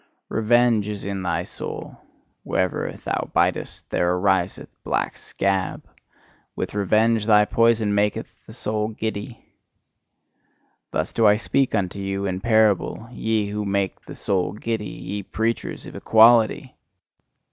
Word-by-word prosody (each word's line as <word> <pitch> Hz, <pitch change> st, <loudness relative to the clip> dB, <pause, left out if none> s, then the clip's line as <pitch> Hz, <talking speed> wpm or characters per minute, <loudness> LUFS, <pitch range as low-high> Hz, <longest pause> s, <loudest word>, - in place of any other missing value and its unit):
Revenge 115 Hz, -1 st, +3 dB
is 105 Hz, -2 st, -5 dB
in 100 Hz, -1 st, -3 dB
thy 90 Hz, -2 st, -1 dB
soul: -, -, -7 dB, 0.5 s
wherever 95 Hz, -1 st, -1 dB
thou -, -, -4 dB
bitest, -, -, 0 dB
there 90 Hz, 0 st, +2 dB
ariseth 95 Hz, -1 st, 0 dB
black -, -, -1 dB
scab; 95 Hz, -2 st, -2 dB, 0.7 s
with -, -, -4 dB
revenge, 110 Hz, +2 st, +2 dB
thy 105 Hz, -1 st, +6 dB
poison 115 Hz, -2 st, +2 dB
maketh 105 Hz, 0 st, +1 dB, 0.2 s
the -, -, -11 dB
soul 105 Hz, 0 st, -2 dB
giddy! 110 Hz, +1 st, -5 dB, 1.4 s
Thus 80 Hz, -, -2 dB
do 115 Hz, -2 st, +4 dB
I 105 Hz, -, +6 dB
speak 130 Hz, +3 st, 0 dB
unto 100 Hz, -1 st, -1 dB
you 95 Hz, 0 st, -2 dB
in 95 Hz, -1 st, -2 dB
parable, 110 Hz, 0 st, +2 dB
ye 110 Hz, -3 st, -1 dB
who 105 Hz, 0 st, -2 dB
make 100 Hz, -1 st, -1 dB
the -, -, -11 dB
soul 95 Hz, -1 st, -1 dB
giddy, 110 Hz, -1 st, -3 dB
ye 100 Hz, +2 st, -5 dB
preachers 115 Hz, +4 st, -3 dB
of -, -, -10 dB
EQUALITY! 115 Hz, 0 st, +4 dB
105 Hz, 130 wpm, -23 LUFS, 100-110 Hz, 1.4 s, thy